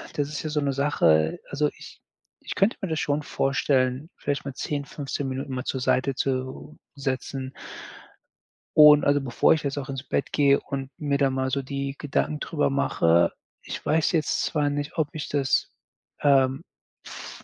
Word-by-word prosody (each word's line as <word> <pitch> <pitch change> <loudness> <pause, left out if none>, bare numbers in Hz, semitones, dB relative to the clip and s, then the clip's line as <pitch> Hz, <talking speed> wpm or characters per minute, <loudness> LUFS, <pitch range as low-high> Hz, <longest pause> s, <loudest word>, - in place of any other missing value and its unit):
das 145 -1 -1
ist 155 - -5
ja 155 - -3
so 150 - 0
'ne 140 -1 0
Sache. 80 - +2
Also 150 +1 +1
ich - - -12 0.5
ich - - -5
könnte 195 +4 +3
mir 190 - -3
das 160 -1 -1
schon 145 0 0
vorstellen, 135 0 0
vielleicht 145 0 -2
mal 140 - -5
10, 145 +2 -3
15 140 0 -4
Minuten 135 +1 -4
mal 130 - -3
zur 135 - -3
Seite 130 +2 +1
zu 130 +2 -3 0.2
setzen. 135 -1 -4 1.2
Und 150 -1 +9
also 145 0 +3
bevor 130 -3 +3
ich 160 - -2
jetzt 140 0 -2
auch 140 -1 -4
ins 135 -1 -5
Bett 140 - -2
gehe 140 -1 +4
und 135 -1 -5
mir 145 -2 0
da 140 -2 +3
mal 130 0 -1
so 140 - 0
die 140 0 -4
Gedanken 150 +1 -1
darüber 150 +1 0
mache 85 -11 +3 0.3
ich - - -6
weiß 160 0 +2
jetzt 160 -3 +1
zwar 150 -2 0
nicht, 145 +2 -4
ob 160 -3 +2
ich 155 - -5
das, 140 -3 +1 0.5
ähm, 135 0 +3 0.4
v - - -10
140 Hz, 180 wpm, -25 LUFS, 130-150 Hz, 1.2 s, Und